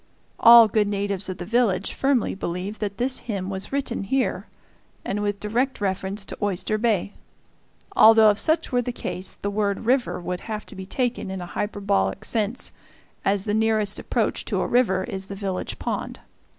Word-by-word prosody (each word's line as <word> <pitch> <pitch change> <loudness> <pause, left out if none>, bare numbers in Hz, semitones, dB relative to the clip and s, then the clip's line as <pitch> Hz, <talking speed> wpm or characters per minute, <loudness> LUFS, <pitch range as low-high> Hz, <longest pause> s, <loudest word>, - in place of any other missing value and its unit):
All 230 -1 +9
good 210 0 +1
natives 200 -1 -2
of 185 - -4
the 180 - -6
village 225 -2 +1
firmly 270 -4 +1
believe 190 +3 -4
that 200 -2 -3
this 255 +2 +1
hymn 200 -5 -4
was 190 0 -6
written 270 -7 -2
here, 265 +6 -1 0.6
and 205 +1 -2
with 205 -1 -1
direct 240 +6 -1
reference 195 0 -2
to - - -8
Oyster 205 +2 0
Bay; 210 -4 0 0.8
although 220 -1 +8
if 205 - -3
such 315 +1 +1
were 245 -1 +2
the 245 - -3
case 185 -5 -4
the 200 - -4
word 205 0 -1
"river" 250 -3 +1
would 180 0 -4
have 215 -2 -6
to - - -11
be 190 0 -8
taken 245 -2 -2
in 190 0 -4
a 175 - -5
hyperbolic 195 - -1
sense, 220 +3 -1 0.5
as 195 0 +1
the 205 - -1
nearest 215 -2 +2
approach - - -1
to - - -1
a - - -1
river 200 -7 +2
is 190 0 -5
the 200 - -6
village 195 -2 -4
pond. - - -4
205 Hz, 180 wpm, -24 LUFS, 190-230 Hz, 0.8 s, All